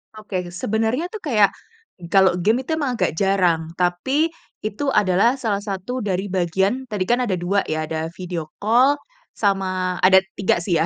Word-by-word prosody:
Oke, 195 -4 -4
sebenernya 225 - -1
tuh 435 - -6
kayak 210 - +3 0.6
kalau 190 -2 +5
game 220 +8 +2
itu 315 +5 -2
emang 280 -5 -1
agak - - +1
jarang, 175 -4 +1
tapi 185 - +1 0.3
itu 215 +6 -3
adalah 205 +3 +3
salah 220 -7 -1
satu 200 +5 -4
dari 200 -2 -2
bagian 190 +7 0
tadi 210 -5 -2
kan 240 - +3
ada 205 - -1
2 185 +3 0
ya, 155 0 -1
ada 160 0 -2
video 175 -3 -5
call 245 +7 +4 0.4
sama 185 -3 0
ada 190 +1 +7 0.2
3 195 - +2
sih 175 -1 0
ya, 160 - +2
195 Hz, 165 wpm, -21 LUFS, 180-230 Hz, 0.6 s, ada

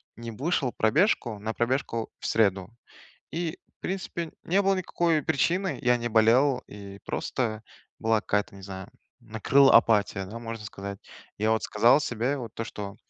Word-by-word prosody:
не 115 0 -7
вышел 135 +1 -1
пробежку 120 - +2
на 110 +2 -3
пробежку 120 -2 -1
в - - -9
среду. 100 -3 +2 0.6
И, 165 0 -3 0.2
в - - -70
принципе, 180 -3 -4
не 190 +4 +2
было 195 0 +2
никакой 170 -4 0
причины, 175 +2 0
я 125 0 +3
не 120 0 -3
болел, 120 +5 +4
и 100 -1 -10
просто 110 -4 -2 0.4
была 110 -1 +2
какая-то, 105 -1 -1
не 95 - -12
знаю, 95 +1 -8 0.3
накрыла 120 +5 +4
апатия, 105 -4 +3
да, 110 +5 -8
можно 115 -2 -6
сказать. 100 -1 -7 0.4
Я, 110 +2 +1
вот, 110 - +1
сказал 115 +7 +4
себе, 125 +4 -1
вот 115 -4 -7
то 115 - -3
что: 100 -3 -7
115 Hz, 160 wpm, -27 LUFS, 105-140 Hz, 0.6 s, болел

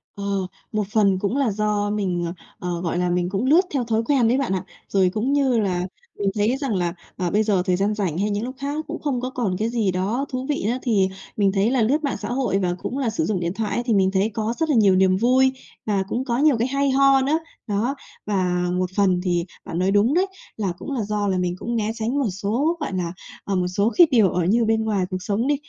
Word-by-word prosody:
Ờ, 200 - -6 0.5
một 215 -1 0
phần 200 -4 +3
cũng 205 +7 -1
là 270 -6 +2
do 210 0 0
mình, 190 -4 -1
ờ, 170 - -3 0.3
ờ, 175 -1 -3
gọi 175 -1 -2
là, 180 0 +1
mình 175 0 0
cũng 195 +5 -1
lướt 310 +7 +6
theo 270 -3 +1
thói 225 -1 0
quen 255 -2 +3
đấy 245 +3 +3
bạn 270 -8 0
ạ. 190 - -1 0.3
Rồi 190 -2 +3
cũng 235 +6 0
như 270 -5 +2
là 180 -3 0 0.3
mình 200 -1 +1
thấy 215 +5 +1
rằng 270 -6 -2
là, 175 -2 0 0.2
ờ, 180 -1 -1
bây 215 +1 +3
giờ 205 -4 +2
thời 180 - +2
gian 200 +3 +1
rảnh 190 -7 -2
hay 205 +3 0
những 205 +1 -1
lúc 255 +2 -5
khác 280 +1 -3
nó 310 - -1
cũng - - -5
không 270 -5 -1
có 255 - -2
còn 235 -8 -2
cái 220 +2 0
gì 225 -5 0
đó 200 +9 -1
thú 255 0 -3
vị 290 - -1
nữa, 240 +3 0
thì 210 -7 +2 0.3
mình 200 -2 +3
thấy 200 +4 +1
là 260 -2 +2
lướt 280 +8 +2
mạng 285 - -1
xã - - -6
hội 245 -6 0
và 180 -2 0
cũng 255 - -4
là 265 -4 0
sử 220 - -1
dụng 205 -4 0
điện 170 0 -2
thoại 215 0 -2
ấy, 240 - -1
thì 235 - +1
mình 190 -2 +3
thấy 195 +3 +2
có 220 +1 -1
rất 320 -1 0
là 295 - +3
nhiều 200 -4 +5
niềm 185 0 +4
vui 260 +4 +3 0.3
và 200 -3 +1
cũng 250 +5 -2
có 240 -3 0
nhiều 290 -2 +4
cái 235 +2 +1
hay 275 +1 +1
ho 275 0 +5
nữa. 290 +5 +1 0.3
Đó, 220 +6 0 0.3
và 180 -3 0
một 185 0 0
phần 185 -3 +2
thì 175 -2 0 0.2
bạn 165 - -4
nói 185 +2 +2
đúng 205 +6 +3
đấy, 370 +4 +2 0.3
là 200 -4 -1
cũng 285 - -7
là 250 -5 -1
do 205 0 -1
là 190 -2 +1
mình 180 -1 -1
cũng 235 +5 -3
né 220 -1 0
tránh 230 +4 -2
một 260 -6 +1
số, 225 - -1
gọi 290 -10 -3
là, 175 -2 -2 0.3
ờ, 200 - -2
một 180 -1 +1
số 200 +5 +1
cái 350 -2 +8
điều 220 -7 +5
ở 180 +1 0
như 225 +6 +3
bên 220 0 +1
ngoài 205 -4 0
cuộc 185 - -2
sống 210 +5 0
đi, 290 - +3
210 Hz, 270 wpm, -23 LUFS, 190-255 Hz, 0.5 s, cái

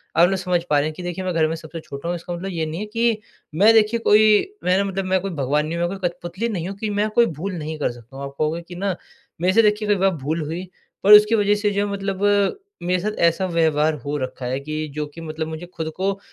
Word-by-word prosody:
आप 170 +1 +6
लोग 195 - 0
समझ 180 -1 0
पा 150 - +4
रहे 145 - 0
हैं 155 - -4
कि 180 - -8
देखिए, 175 +1 -4
मैं 185 - -1
घर 160 -1 +3
में 160 - -2
सबसे 165 0 -8
छोटा 140 0 -8
हूँ, 175 - 0
इसका 175 +1 -6
मतलब 185 +3 -5
ये 165 -3 -2
नहीं 155 +2 -5
है - - -3
कि 230 -1 +2 0.4
मैं 210 +7 +6
देखिए, 220 +1 +4
कोई 215 - +4
मैं 180 +1 +3
ना 200 - +2
मतलब 195 -1 -3
मैं 185 0 +2
कोई 195 +1 -4
भगवान 145 +3 +1
नहीं 165 +2 -3
हूँ, 175 0 0
मैं 195 - -5
कोई 180 -2 +1
कठपुतली 175 +6 -5
नहीं 180 -6 -3
हूँ 195 - -7
कि 215 +1 -3
मैं 210 +1 +2
कोई 235 - +6
भूल 175 +2 -4
नहीं 155 -1 -5
कर 145 - 0
सकता 120 +2 -15
हूँ। 140 - -6
आप 140 0 -9
कहोगे 155 +2 0
कि 175 - -9
ना, 190 +1 -1 0.5
मेरे 185 +1 +3
से 225 - +6
देखिए 210 0 +2
कई 205 - +5
बार 195 0 +2
भूल 160 +4 -1
हुई, 165 +4 -4 0.4
पर 205 +2 +8
उसकी 210 +2 +8
वजह 205 -1 +3
से 205 0 0
जो 200 0 0
है, 205 - -4
मतलब 195 0 -3 0.6
मेरे 180 +1 +1
साथ 210 +3 -1 0.2
ऐसा 190 +3 -3
व्यवहार 160 -3 +2
हो 145 +1 -2
रखा 130 -1 -5
है 130 +2 -1
कि 155 +2 -4
जो 150 0 -2
कि 150 +3 -11
मतलब 160 0 -4
मुझे 160 +2 -6
खुद 160 -1 -4
को 195 +1 -1
175 Hz, 280 wpm, -22 LUFS, 155-200 Hz, 0.6 s, पर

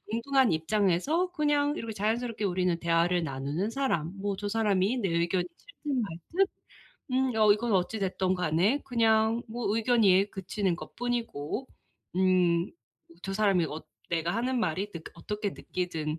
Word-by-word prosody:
동등한 260 +2 +2
입장에서 205 - +1
그냥 295 -2 +1
이렇게 225 -1 -4
자연스럽게 220 +2 -1
우리는 180 -2 +1
대화를 170 +1 +2
나누는 140 +8 -2
사람 230 - -1
뭐 200 0 -1
저 205 +1 -4
사람이 210 +1 +1
내 200 - 0
의견이 170 +2 +1
싫든 290 - -4
말든 210 - -1 0.7
음 260 0 +2 0.2
이건 225 +1 -2
어찌 190 +4 +1
됐든 185 -1 0
간에 180 - +1
그냥 225 -2 +2
뭐 220 -2 -2
의견이 210 -4 +4
그치는 190 -1 -1
것 - - -11
뿐이고 240 - -3 0.5
음 180 -1 +3 0.5
저 195 - -4
사람이 195 -5 +3
어 155 +2 -6 0.3
내가 170 +1 0
하는 250 +3 0
말이 195 +2 -1
그 170 - -7
어떻게 210 +4 -3
느끼든 165 -5 -4
200 Hz, 305 characters per minute, -29 LUFS, 175-235 Hz, 0.7 s, 의견이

